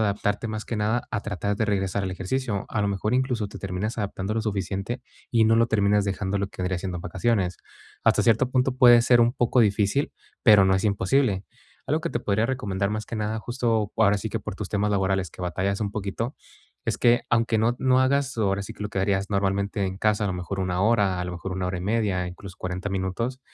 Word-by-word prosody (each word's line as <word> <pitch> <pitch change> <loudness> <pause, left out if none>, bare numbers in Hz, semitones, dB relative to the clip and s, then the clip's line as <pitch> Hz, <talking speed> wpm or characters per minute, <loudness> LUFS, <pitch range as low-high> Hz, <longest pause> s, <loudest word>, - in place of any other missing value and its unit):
adaptarte, 105 +1 0
más 110 0 -4
que 115 - -3
nada, 110 +3 0
a 105 - -1
tratar 100 0 -2
de 110 - +1
regresar 100 -1 0
al 95 - -2
ejercicio, 100 +3 -2
a 105 - -1
lo 100 - +1
mejor 105 +4 -1
incluso 125 -5 0
te - - -9
terminas 100 +4 -3
adaptando 100 0 -3
lo 110 - 0
suficiente 100 +3 -3 0.3
y 115 -2 +4
no 115 0 +4
lo 115 +1 +4
terminas 105 -1 +2
dejando 95 0 -2
lo 100 0 -1
que 95 - -10
vendría 90 -1 -1
siendo 90 -1 -4
en - - -7
vacaciones, 95 0 0 0.5
hasta - - +3
cierto 120 +2 +3
punto 130 0 +2
puede 120 -2 +8
ser 120 0 +4
un 120 +1 +3
poco 120 -1 +2
difícil, 105 +5 +2 0.3
pero 105 -5 +7
no 95 - +4
es 95 - 0
imposible. 100 +1 +1 0.4
Algo - - +1
que - - -3
te - - -1
podría 110 +3 +1
recomendar, 100 -7 -1
más 110 0 -3
que - - -6
nada, 110 +1 -2
justo, 115 -3 -1
ahora 105 -2 +4
sí 110 - -4
que 115 - -2
por 95 - -6
tus 100 -1 -5
temas 105 0 0
laborales, 95 -3 0
que 90 - -10
batallas 95 +3 -1
un 100 -2 -1
poquito, 110 +5 -3 0.5
es - - 0
que, 120 0 +4
aunque 115 -1 +2
no 120 +3 +2
no 130 -1 +3
hagas, 135 0 +1
ahora 100 -2 +1
sí - - -7
que - - -8
lo 105 - -2
que 100 - -3
harías 95 0 0
normalmente 100 0 0
en 95 0 -4
casa, 105 0 +1
a - - +1
lo 95 - -1
mejor 90 +2 -4
1 90 0 -1
hora, 105 -5 +2
a - - -2
lo 90 - -5
mejor 90 +2 -5
1 90 -1 -2
hora 90 0 -2
y - - -6
media, 100 -4 0
incluso 90 +1 -9
40 90 +2 -4
minutos, 95 +7 -2
105 Hz, 235 wpm, -25 LUFS, 95-115 Hz, 0.5 s, puede